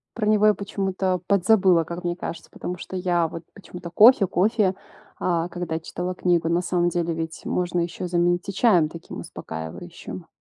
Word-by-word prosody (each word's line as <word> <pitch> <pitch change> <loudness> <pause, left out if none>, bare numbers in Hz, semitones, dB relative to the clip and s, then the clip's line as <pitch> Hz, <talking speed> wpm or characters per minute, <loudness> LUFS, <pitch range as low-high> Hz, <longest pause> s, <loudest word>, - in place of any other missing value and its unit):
Про 220 - -1
него 215 0 +4
я 210 - +6
почему-то 190 -2 -2
подзабыла, 190 -3 +4
как 170 +2 -7
мне 175 0 -1
кажется. 170 -2 -7
Потому 180 - -5
что 185 - -8
я 175 -2 +1
вот 165 +1 -8
почему-то: 180 -3 -10
кофе 210 +3 +6
кофе, 200 +1 +2 0.4
а, 170 -1 0
когда 175 -2 -3
читала 180 +2 -4
книгу, 170 -2 +1
на 170 +1 +2
самом 175 -1 +1
деле 170 -1 -1
ведь 160 0 -5
можно 175 -1 -1
ещё 170 +1 -3
заменить 175 +1 +1
и - - -3
чаем 180 -7 +4
таким 165 +1 -9
успокаивающим. 80 0 -8
175 Hz, 175 wpm, -24 LUFS, 170-190 Hz, 0.4 s, я